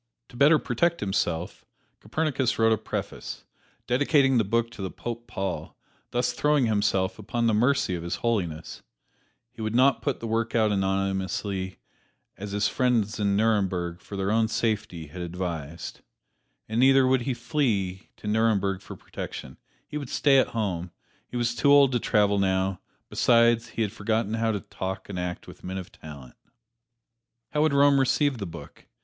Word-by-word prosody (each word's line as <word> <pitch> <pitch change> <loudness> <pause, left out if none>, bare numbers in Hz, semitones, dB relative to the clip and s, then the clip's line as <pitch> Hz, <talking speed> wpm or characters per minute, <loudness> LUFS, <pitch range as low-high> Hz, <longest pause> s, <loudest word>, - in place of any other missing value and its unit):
To - - -15
better 145 +5 +6
protect 170 +2 0
himself, 90 -4 -2 0.4
Copernicus 135 +1 -1
wrote 115 0 +4
a - - +1
preface, 110 - -5 0.4
dedicating 135 0 +3
the - - +3
book 115 +3 0
to 110 - -9
the 95 - -3
Pope 120 +3 -6
Paul, 95 0 -4 0.3
thus 125 0 0
throwing 150 -3 +2
himself 100 -3 +1
upon 120 -2 -2
the 115 - +3
mercy 125 -1 +2
of 85 - -3
His 85 0 -3
Holiness. 85 -9 -2 0.7
He 120 - -11
would 110 +1 -2
not 130 -2 +4
put - - -1
the - - -6
work 115 +1 -1
out 110 -2 +3
anonymously, 95 0 -1 0.6
as 100 0 -7
his 100 +1 +1
friends 115 -4 +1
in 100 -1 +2
Nuremberg, 95 -5 0
for 100 - -8
his 95 0 -1
own 110 0 +3
safety, 105 -7 -2
had 75 +5 -9
advised. 85 -3 -5 0.7
And 110 +2 -1
neither 135 +1 +6
would 130 0 +3
he 125 +1 -2
flee 115 - -1
to - - -9
Nuremberg 105 -3 +1
for - - -9
protection; 65 - -8 0.3
he 150 - -5
would 140 -4 -7
stay 140 -2 +4
at - - +3
home 90 -5 -2 0.4
he 125 - -5
was 120 -1 0
too 130 +5 +3
old 140 -2 +7
to 120 - +1
travel 105 -3 +2
now 95 -1 0 0.3
besides, 115 -1 +3
he 115 0 -2
had 105 - -2
forgotten 110 0 -1
how 115 0 +1
to 105 -3 -2
talk 95 +1 -6
and 95 -3 -4
act 90 0 -4
with - - -13
men 95 +1 -4
of 95 -2 -7
talent. 70 -5 -11 1.2
How 150 - +1
would 155 -2 +3
Rome 140 0 +5
receive 135 0 +2
the 100 - -4
book? 85 - -11
110 Hz, 170 wpm, -26 LUFS, 95-125 Hz, 1.2 s, old